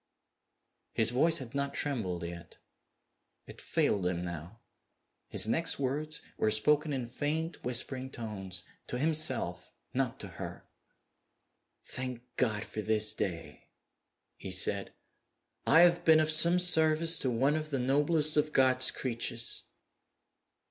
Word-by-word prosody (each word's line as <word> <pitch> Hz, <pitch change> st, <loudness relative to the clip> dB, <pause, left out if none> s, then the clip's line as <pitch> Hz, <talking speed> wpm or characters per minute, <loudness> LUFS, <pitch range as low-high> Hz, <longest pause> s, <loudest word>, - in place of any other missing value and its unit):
His 110 Hz, 0 st, +3 dB
voice 160 Hz, +7 st, +3 dB
had 130 Hz, -5 st, -8 dB
not 140 Hz, 0 st, -2 dB
trembled 95 Hz, -, -3 dB
yet. 85 Hz, -1 st, -9 dB, 0.9 s
It -, -, -12 dB
failed 95 Hz, -4 st, 0 dB
him 90 Hz, -1 st, -3 dB
now. 85 Hz, +6 st, -8 dB, 0.7 s
His -, -, +3 dB
next 165 Hz, +8 st, 0 dB
words 150 Hz, +3 st, -3 dB, 0.2 s
were 110 Hz, -, +2 dB
spoken 150 Hz, +8 st, +2 dB
in 130 Hz, -4 st, -3 dB
faint 155 Hz, +6 st, -3 dB
whispering 130 Hz, +1 st, -3 dB
tones 95 Hz, -7 st, -5 dB, 0.2 s
to 125 Hz, -, -3 dB
himself; 150 Hz, -, 0 dB, 0.2 s
not 125 Hz, -2 st, -2 dB
to -, -, -7 dB
her. -, -, -9 dB, 1.2 s
"Thank 125 Hz, -2 st, -6 dB
God 110 Hz, -5 st, 0 dB
for 110 Hz, -, -6 dB
this 110 Hz, 0 st, +2 dB
day!" 85 Hz, -4 st, -6 dB, 0.7 s
he -, -, -8 dB
said. -, -, +1 dB, 0.8 s
"I 165 Hz, -, +6 dB
have 175 Hz, 0 st, +4 dB
been 160 Hz, -1 st, +6 dB
of 155 Hz, 0 st, +2 dB
some 170 Hz, +3 st, +6 dB
service 165 Hz, -2 st, +3 dB
to 130 Hz, -, 0 dB
one 135 Hz, +5 st, +1 dB
of 155 Hz, -1 st, -4 dB
the 140 Hz, -, -2 dB
noblest 150 Hz, +4 st, +2 dB
of 150 Hz, 0 st, +1 dB
God's 130 Hz, -1 st, +4 dB
creatures!" 120 Hz, -1 st, -3 dB
130 Hz, 130 wpm, -30 LUFS, 110-155 Hz, 1.2 s, I